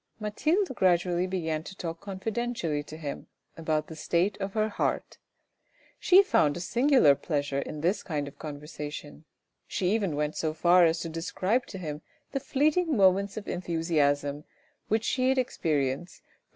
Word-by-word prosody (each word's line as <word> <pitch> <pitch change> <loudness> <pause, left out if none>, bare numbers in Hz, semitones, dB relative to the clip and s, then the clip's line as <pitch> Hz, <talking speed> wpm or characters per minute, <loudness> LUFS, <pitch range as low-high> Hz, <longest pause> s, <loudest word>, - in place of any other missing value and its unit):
Mathilde 310 - 0
gradually 180 -3 +2
began 160 -4 -2
to 190 +4 -10
talk 165 -2 -5
confidentially 200 -5 -2
to 150 +1 -10
him 145 -3 -6 0.3
about 155 -2 -1
the 160 - -10
state 175 +5 0
of 195 0 -3
her 215 -1 +1
heart. 215 - -2 0.8
She 375 +2 +6
found 150 - +2
a - - -4
singular 245 - +4
pleasure 145 -1 -2
in 150 +1 -5
this 180 +6 +1
kind 150 -5 -3
of 140 - -12
conversation, 150 0 -7 0.4
she 185 -1 0
even 200 -8 0
went 150 +1 -1
so 155 -1 -2
far 175 +2 +5
as 165 +1 +1
to 165 - -4
describe 185 +8 -1
to 190 - -7
him 155 -4 -5 0.3
the 275 - -1
fleeting 295 +3 +1
moments 195 +1 +3
of 210 - -6
enthusiasm 150 -4 0 0.4
which 220 +1 +1
she 255 +1 +1
had 265 - +2
experienced 155 - -1
for - - -43
M. - - -34
175 Hz, 165 wpm, -28 LUFS, 155-210 Hz, 0.8 s, She